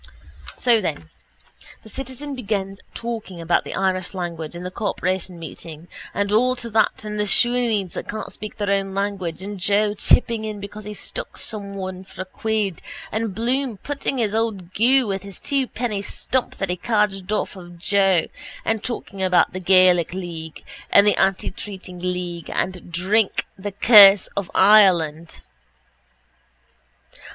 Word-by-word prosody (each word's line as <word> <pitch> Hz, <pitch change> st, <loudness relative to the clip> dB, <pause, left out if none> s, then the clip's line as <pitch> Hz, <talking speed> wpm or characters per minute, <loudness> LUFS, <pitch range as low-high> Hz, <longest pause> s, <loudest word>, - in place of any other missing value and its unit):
So 235 Hz, -3 st, +3 dB
then 85 Hz, -, -4 dB, 0.7 s
the -, -, -14 dB
citizen 270 Hz, +4 st, -6 dB
begins 200 Hz, -5 st, -3 dB, 0.2 s
talking 225 Hz, -6 st, -5 dB
about 170 Hz, +1 st, +1 dB
the -, -, -5 dB
Irish 185 Hz, 0 st, -1 dB
language 170 Hz, -3 st, -5 dB
and 175 Hz, +1 st, -7 dB
the 180 Hz, -, -4 dB
corporation 185 Hz, -2 st, -2 dB
meeting 165 Hz, 0 st, -9 dB, 0.2 s
and 205 Hz, 0 st, -1 dB
all 250 Hz, +4 st, +3 dB
to 240 Hz, -2 st, -7 dB
that 220 Hz, 0 st, +1 dB
and 210 Hz, 0 st, -4 dB
the 210 Hz, -, 0 dB
shoneens 230 Hz, -4 st, +3 dB
that -, -, -6 dB
can't 215 Hz, +1 st, -5 dB
speak 215 Hz, -, -8 dB
their 205 Hz, -2 st, -1 dB
own 195 Hz, -1 st, 0 dB
language 195 Hz, -3 st, -3 dB
and 200 Hz, 0 st, -6 dB
Joe 205 Hz, +3 st, +2 dB
chipping 225 Hz, +2 st, +2 dB
in 215 Hz, -1 st, -5 dB
because 205 Hz, +1 st, -8 dB
he 210 Hz, 0 st, -6 dB
stuck -, -, -7 dB
someone 195 Hz, -3 st, -5 dB
for 185 Hz, -1 st, -7 dB
a -, -, -18 dB
quid 210 Hz, -1 st, -2 dB, 0.3 s
and 220 Hz, -3 st, -2 dB
Bloom 245 Hz, 0 st, 0 dB
putting 280 Hz, +3 st, -3 dB
in 240 Hz, -, +1 dB
his 210 Hz, -1 st, -1 dB
old 210 Hz, -5 st, -2 dB
goo 255 Hz, +4 st, +5 dB
with 195 Hz, -2 st, -2 dB
his 200 Hz, -2 st, -10 dB
twopenny 250 Hz, -6 st, -2 dB
stump 255 Hz, +5 st, -2 dB
that 195 Hz, -2 st, -2 dB
he 180 Hz, -, -2 dB
cadged 210 Hz, -1 st, 0 dB
off 215 Hz, -, -1 dB
of 175 Hz, -2 st, -11 dB
Joe 190 Hz, -1 st, +2 dB, 0.4 s
and 225 Hz, -2 st, 0 dB
talking 200 Hz, -5 st, -4 dB
about 185 Hz, -1 st, +3 dB
the 185 Hz, -, -4 dB
Gaelic 180 Hz, -2 st, +4 dB
league 165 Hz, -4 st, -7 dB, 0.3 s
and 200 Hz, -, +6 dB
the 210 Hz, -, +5 dB
antitreating 190 Hz, -1 st, -2 dB
league 180 Hz, -2 st, -4 dB
and 185 Hz, -2 st, -3 dB
drink, 190 Hz, +5 st, +1 dB
the 205 Hz, +2 st, -5 dB
curse 200 Hz, -2 st, +8 dB
of 200 Hz, -3 st, -3 dB
Ireland. 175 Hz, -6 st, +4 dB
200 Hz, 155 wpm, -22 LUFS, 185-215 Hz, 0.7 s, curse